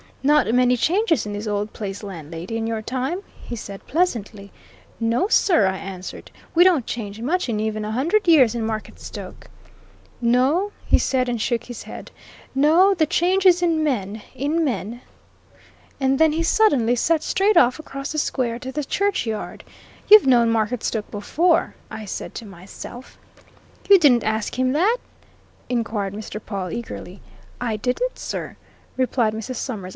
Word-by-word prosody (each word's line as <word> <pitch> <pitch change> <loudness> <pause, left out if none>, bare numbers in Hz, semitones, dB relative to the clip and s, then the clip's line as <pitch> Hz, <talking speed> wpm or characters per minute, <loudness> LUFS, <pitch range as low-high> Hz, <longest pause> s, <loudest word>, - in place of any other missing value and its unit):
'Not 295 -3 +4
many 250 0 +4
changes 350 - +1
in 205 - -4
this 205 +2 -5
old 205 0 -2
place, 200 -2 -5
landlady, 170 +1 -7
in 225 - -2
your 225 -1 -2
time?' 260 - -3 0.2
he 240 - -6
said 200 -3 -9
pleasantly. 225 - -1 0.5
'No, 230 +10 +1
sir,' 345 - +4
I 190 0 -1
answered. 190 -1 -8 0.2
'We 345 - +6
don't 345 -10 +3
change 210 -2 -5
much 320 +4 -1
in 215 -2 -1
even 215 0 -2
a 210 - -4
hundred 335 - +1
years 270 -9 +6
in 235 -2 -2
Marketstoke.' 220 -1 -7 0.7
'No!' 260 +12 +2
he - - +4
said, 255 -1 +1
and 240 -2 -2
shook 235 0 0
his 245 -1 -8
head. - - -10 0.4
'No 320 +8 +5
the 320 -5 +1
change 370 +4 +2
is 355 -1 +5
in 325 -2 +2
men, 215 -7 -2
in 305 +5 0
men!' 235 -3 -3 1.0
And 270 0 +1
then 320 -1 +4
he 330 +1 0
suddenly 280 - +3
set 315 +6 +1
straight 390 +3 +2
off 255 -1 +4
across 275 -2 -6
the 310 - -1
square 240 -5 -1
to 260 +1 -6
the 295 +2 -3
churchyard. 270 - -2 0.4
'You've 420 -8 +8
known 235 -3 +5
Marketstoke 220 -1 -1
before,' 325 - +1 0.2
I 220 -1 -7
said 195 - -6
to 230 - -6
myself." 195 +6 -11 0.7
"You 400 - +9
didn't 270 - +4
ask 220 +1 -2
him 255 0 +1
that?" 390 +11 +3 0.7
inquired 225 -5 -2
Mr. 215 0 -6
Pawle, 195 -4 -4
eagerly. 205 -4 -7 0.4
"I 235 -3 -1
didn't, 255 - -2
sir," - - -5 0.4
replied 245 -4 +1
Mrs. 225 +4 -5
Summers. 215 -7 -5
245 Hz, 160 wpm, -22 LUFS, 215-315 Hz, 1.0 s, You